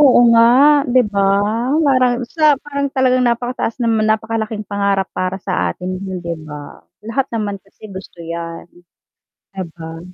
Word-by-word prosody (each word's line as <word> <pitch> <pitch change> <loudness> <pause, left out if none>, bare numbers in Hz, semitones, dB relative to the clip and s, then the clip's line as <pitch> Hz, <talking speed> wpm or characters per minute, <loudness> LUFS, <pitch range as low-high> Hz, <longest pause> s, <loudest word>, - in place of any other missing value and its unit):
Oo 270 -4 +6
nga, 230 0 +6 0.5
'di 255 - +5
ba? 200 -1 +2 0.6
Parang 255 -2 +3 0.2
sa 305 -2 +5
parang 280 -1 -2
talagang 255 -1 +2
napakataas 240 -1 -1
naman 225 -2 +1
napakalaking 220 0 -1
pangarap 200 -1 0
para 185 +1 -2
sa 190 - -1
atin 185 +1 -5
'yon, 190 -2 -5
'di 170 -1 -3
ba? 150 -1 -10 0.3
Lahat 255 +4 -1
naman 205 -3 -2
kasi 200 +2 -15
gusto 190 -2 -10
'yan, 165 0 -6 0.9
'di 190 -1 -4
ba? 165 -1 -8
215 Hz, 150 wpm, -18 LUFS, 185-245 Hz, 0.9 s, Oo